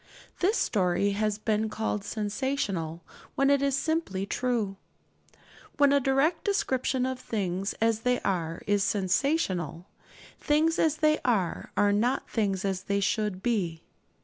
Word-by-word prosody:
This 400 +6 +2
story 190 0 +1
has 210 +1 0
been 215 0 0
called 210 -1 -2
'sensational,' 205 - -2 0.3
when 275 +1 +3
it 280 -1 +3
is 275 -1 +1
simply 295 - -1
true. 225 -4 -1 1.0
When 285 -1 +5
a 285 - +5
direct 275 +5 +1
description 260 - 0
of 260 -1 -3
things 195 -5 -2
as 225 -1 +2
they 250 +1 +1
are 165 -3 -2
is 205 -1 +2
sensational, 185 - 0 0.5
things 315 +2 +2
as 310 -1 +2
they 305 -1 +3
are 200 -9 0
are 205 0 +4
not 240 +6 +1
things 200 -4 -1
as 190 -1 -2
they 200 0 0
should 200 -1 -1
be. 180 -9 -1
215 Hz, 140 wpm, -28 LUFS, 195-270 Hz, 1.0 s, When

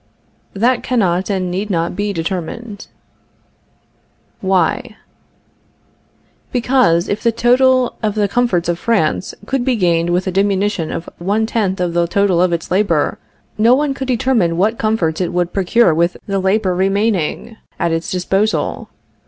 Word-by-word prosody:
That 240 +5 +2
cannot 190 -7 0
and 185 -3 -1
need 195 +4 -3
not 170 -2 -1
be 205 +1 -1
determined. 195 +5 -5 1.5
Why? 190 +4 0 1.5
Because, 240 -9 +2
if 205 - -2
the 230 - +2
total 250 +2 +3
of 215 -2 -1
the 210 -1 +1
comforts 200 -6 0
of 175 0 -1
France 195 -5 0
could 270 +2 -1
be 255 -1 +1
gained 170 -4 +1
with 180 +1 0
a 185 - -1
diminution 195 -2 0
of 165 - -5
one 205 +5 0
tenth 205 -5 -1
on 175 -2 -1
the 170 0 +1
total 190 -1 +2
of 180 -1 +2
its 170 -1 -3
labor, 180 -6 +1 0.4
no 230 +3 +5
one 285 0 0
could 265 -1 -5
determine 230 -9 +1
what 215 +5 +1
comforts 200 -7 0
it 180 - -1
would 175 0 -1
procure 195 0 +3
with 170 +2 0
the 195 -1 -1
labor 190 0 +1
remaining 195 +2 -1 0.2
at 170 - 0
its 165 +1 -2
disposal. 195 +4 -1
195 Hz, 150 wpm, -17 LUFS, 175-225 Hz, 1.5 s, no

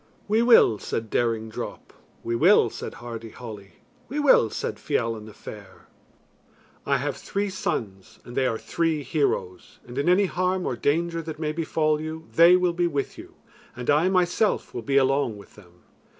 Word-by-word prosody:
"We 215 +2 +3
will," 230 - +6
said 110 -1 -4
Daring 115 -2 0
Drop. 110 - -7 0.3
"We 115 - -1
will," 155 - +5
said - - -7
Hardy 115 -1 -8
Holly. 105 -4 -10 0.4
"We 285 - -4
will," 280 - +5
said - - -4
Fiallan 115 -2 -2
the 110 - -11
Fair. 100 -4 -11 1.0
"I - - +3
have - - -2
three 200 0 -3
sons, 110 - -4
and 120 - -10
they 130 - +2
are 115 - -1
three 160 0 -1
heroes, 110 - -2
and 120 +3 -6
in 145 - +1
any 190 +3 +4
harm 185 0 -1
or 125 - -1
danger 165 +6 0
that 160 -1 -7
may 155 -1 -2
befall 155 -1 0
you, 160 +1 -6
they 170 +2 +7
will 180 -1 +2
be 175 0 +1
with 145 -4 -3
you, - - -12 0.4
and 125 +2 -1
I 155 +5 +3
myself 185 +3 +1
will 120 - -4
be 135 +5 +1
along 135 -4 +2
with 100 - -15
them." 90 -4 -19
145 Hz, 180 wpm, -25 LUFS, 115-170 Hz, 1.0 s, they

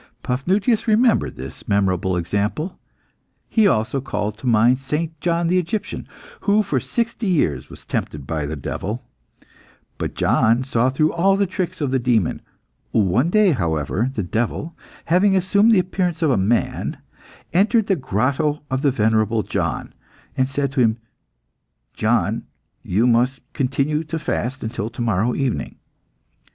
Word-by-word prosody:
Paphnutius 195 - +1
remembered 225 +2 +3
this 65 +1 -9
memorable 95 -2 +1
example. 105 - -2 0.7
He 220 -3 +3
also 125 - +1
called 105 -4 -3
to 130 - -5
mind 120 +2 +4
St. 150 +4 -2
John 170 0 +1
the 180 +2 +3
Egyptian, 180 +5 -4 0.3
who 210 +1 +2
for 140 -9 0
sixty 235 - -2
years 150 - 0
was - - -13
tempted 70 -3 -3
by 75 -1 -2
the 80 - -4
devil. 105 - -4 0.9
But - - -3
John 115 +3 +3
saw 130 -1 +1
through 155 +4 +1
all 195 +3 +3
the 200 - +2
tricks 185 -3 -4
of 140 -3 0
the 135 - +2
demon. 120 -7 +1 0.5
One 110 - +2
day, 210 0 +4
however, 85 - 0
the 105 - -1
devil, 120 - -2 0.3
having 195 +4 +3
assumed 200 +4 +4
the 220 - +5
appearance 180 -2 0
of 155 - +3
a - - +3
man, 105 +4 0 0.6
entered 210 +5 +3
the 195 - +2
grotto 140 - 0
of 130 0 0
the 140 - +3
venerable 110 -2 +1
John, - - -3 0.4
and 130 0 +1
said 140 -1 -1
to 140 -2 +1
him, 115 -1 +3 1.0
"John, - - 0 0.3
you 105 +6 +1
must 125 +2 +2
continue 140 +3 0
to 160 +2 -3
fast 130 -4 -3
until 110 -1 -3
to 120 +1 -7
morrow 115 +2 +1
evening." 135 -4 -2
130 Hz, 150 wpm, -21 LUFS, 110-175 Hz, 1.0 s, the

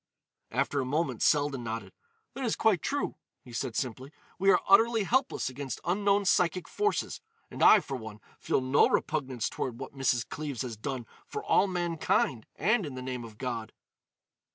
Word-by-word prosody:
After 145 - 0
a - - -1
moment 135 -3 -1
Selden 145 -4 +2
nodded. 115 0 -5 0.4
"That 270 - -5
is 230 - +1
quite 205 -7 +3
true," 285 +1 -2 0.3
he 125 - -13
said 120 -1 -3
simply. 130 +2 -3 0.3
"We 195 +1 +3
are - - +6
utterly 225 +2 +5
helpless 260 +6 +1
against 135 +1 -5
unknown 200 +3 +2
psychic 180 -1 +2
forces. 420 0 -1 0.3
And - - -7
I, 215 - +8
for 135 - -5
one, 110 -4 -8 0.2
feel - - 0
no 130 +2 +4
repugnance 130 -6 -1
toward 120 -3 -4
what 135 - -7
Mrs. 125 -4 0
Cleves 145 -4 -4
has 120 -3 -5
done 125 +2 -4 0.2
for - - -5
all 200 - +3
mankind 170 - 0
and 215 +7 +2
in 145 -5 -6
the 130 - -6
name 125 -2 -4
of 110 -2 -11
God." 115 -3 -4
140 Hz, 175 wpm, -29 LUFS, 125-185 Hz, 0.4 s, I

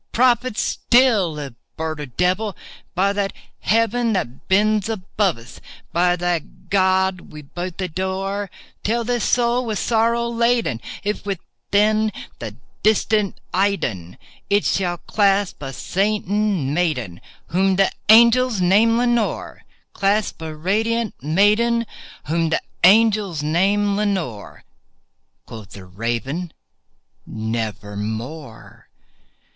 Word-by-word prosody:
—prophet 250 -1 +2
still, 220 -11 +2
if 140 -4 -6 0.2
bird 160 -1 -3
or 145 - -5
devil! 185 - -1 0.4
By 195 +2 +2
that 200 -1 -1 0.3
Heaven 230 +1 +1
that 130 - -4
bends 210 +2 +2
above 200 - -1
us 115 0 -13 0.2
— - - -28
by 175 +1 +3
that 175 -2 -4
God 190 -1 +2
we 150 -1 -10
both 175 +5 -6
adore— 190 +2 -3 0.3
Tell 235 +3 0
this 240 -1 -1
soul 240 0 +2
with 220 -3 -2
sorrow 235 +2 +1
laden 235 - +1 0.2
if, 210 +1 -2
within 210 +2 0 0.3
the 110 -3 -6 0.3
distant 215 -1 +1
Aidenn, 135 - -1 0.3
It 205 +1 +2
shall 175 -2 0
clasp 200 -1 +1
a 135 -1 -5
sainted 200 +6 -1
maiden 155 - 0 0.3
whom 190 +2 +2
the 195 0 +3 0.2
angels 235 0 +6
name 210 +6 +4
Lenore 240 -2 -1
— - - -44
Clasp 200 -2 0
a - - -5
rare 155 -1 -6
and 155 +2 -16
radiant 225 +3 +1
maiden 210 - +2 0.4
whom 165 +1 0
the 160 - 0 0.2
angels 205 -4 +4
name 200 +6 +2
Lenore." 190 - -3 0.8
Quoth 110 -3 -11
the 95 -2 -10
Raven, 120 - -3 0.8
"Nevermore." 110 +4 -5
195 Hz, 120 wpm, -21 LUFS, 160-215 Hz, 0.8 s, angels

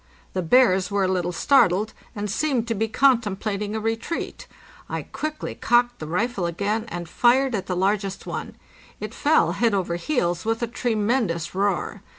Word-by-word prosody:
The 185 - -1
bears 185 -1 +4
were 200 -1 +1
a - - +2
little 180 -1 0
startled, 215 -1 +3 0.2
and 205 0 -3
seemed 245 +2 0
to - - +2
be 225 +1 -1
contemplating 215 -4 +1
a - - -1
retreat. 225 +9 -3 0.4
I - - -3
quickly 310 0 -5
cocked 240 +1 +2
the 155 - -6
rifle 190 +2 -1
again 205 +6 -1
and 175 -5 -5
fired 255 +5 +3
at 200 -4 -2
the 185 - -1
largest 195 +1 0
one. - - -5 0.4
It - - -6
fell - - +3
head 230 -3 +1
over 175 -3 -1
heels, 175 - -1
with 225 +1 -1
a - - 0
tremendous 220 -7 -1
roar. 195 -2 -1
210 Hz, 165 wpm, -24 LUFS, 185-240 Hz, 0.4 s, bears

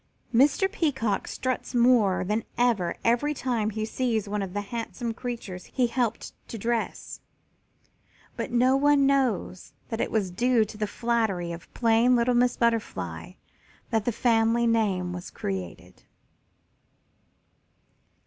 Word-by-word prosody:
Mr. 280 +10 +4
Peacock 265 - -1
struts 255 0 -3
more 235 -7 +4
than 210 +4 -1
ever 230 -8 +1
every 245 +6 +2
time 235 -6 -1
he 215 0 -3
sees 225 -2 -1
one 205 0 -2
of 190 -2 -5
the 205 - 0
handsome 230 +2 -4
creatures 225 -7 -6
he 255 - 0
helped 235 -2 -2
to 230 - -6
dress, 230 +2 -3 1.1
but - - -4
no 250 +2 +4
one 285 0 +4
knows 255 -9 0 0.2
that 225 - -2
it - - -1
was 200 -5 -1
due 240 +3 +2
to 215 - -11
the 210 0 -2
flattery 220 -7 -1
of 170 0 -9
plain 235 +1 +4
little 240 +1 +2
Miss 245 0 +2
Butterfly 230 -1 -1 0.6
that 220 -2 +1
the 240 - +1
family 230 0 +2
name 200 -6 +1
was 175 0 -7
created. 90 -2 -6
230 Hz, 135 wpm, -26 LUFS, 205-245 Hz, 1.1 s, Mr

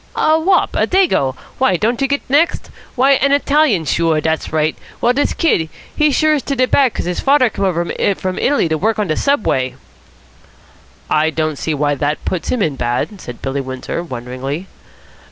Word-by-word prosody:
"A 315 +1 +3
wop. 365 +3 +2
A - - +2
Dago. 345 - +2 0.2
Why, 260 -8 +3
don't 230 +7 0
you 275 - +2
get 280 +1 -2
next? 295 +6 +1 0.2
Why, 265 +2 +4
an 280 +1 +3
Italian. 285 - +2
Sure, 160 +2 +1
dat's 160 +1 -2
right. 155 0 0 0.2
Well, 245 - +2
dis 285 +3 +1
kid, 170 - +1 0.3
he 300 - +3
is 285 - +1
sure 310 -1 +3
to 275 +1 -3
de 255 -1 +3
bad, 260 -1 +2
'cos - - -3
his 180 0 -2
father 270 -4 +3
come 195 - -2
over 175 -2 0 0.3
from 185 0 -4
Italy 280 -10 +2
to 160 -1 -1
work 220 +4 0
on 210 - 0
de 155 -4 -1
Subway." 145 - 0 1.3
"I 155 +1 +2
don't 155 -2 -2
see 160 - -2
why 145 0 +1
that 145 +2 -2
puts 185 - -3
him 240 -5 +1
in 150 -6 -1
bad," 125 - -2
said 120 -1 -9
Billy 135 +1 -2
Windsor 130 +4 -5
wonderingly. 130 +2 -5
185 Hz, 190 wpm, -17 LUFS, -, 1.3 s, Why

